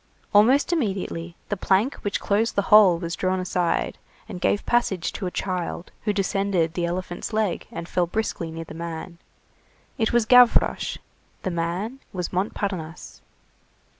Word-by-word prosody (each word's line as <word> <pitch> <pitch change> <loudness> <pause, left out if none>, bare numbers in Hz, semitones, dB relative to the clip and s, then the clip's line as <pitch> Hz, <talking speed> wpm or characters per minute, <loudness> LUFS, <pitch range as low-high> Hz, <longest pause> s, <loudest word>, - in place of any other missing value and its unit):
Almost 255 +11 +5
immediately, 190 - -2
the 205 - 0
plank 195 +7 +2
which 205 - -2
closed 215 +3 0
the 200 - +2
hole 200 -5 +8
was 170 0 -4
drawn 185 0 0
aside, 180 -2 -1 0.3
and 185 -5 -7
gave 205 - +1
passage 200 -8 +1
to 190 - -4
a - - -1
child 180 -1 -4
who 210 - +2
descended 195 -4 0
the 170 0 -1
elephant's 175 +3 -4
leg, 215 -5 -1
and 170 0 -6
fell 175 -1 0
briskly 175 -4 -2
near 165 +1 -6
the - - -10
man. 170 +1 -6 0.8
It 220 - +2
was 235 -2 +3
Gavroche. 250 +1 +4 0.5
The 185 - -1
man 175 +9 -3
was 180 -1 -4
Montparnasse. 185 -3 -3
185 Hz, 150 wpm, -24 LUFS, 170-210 Hz, 0.8 s, hole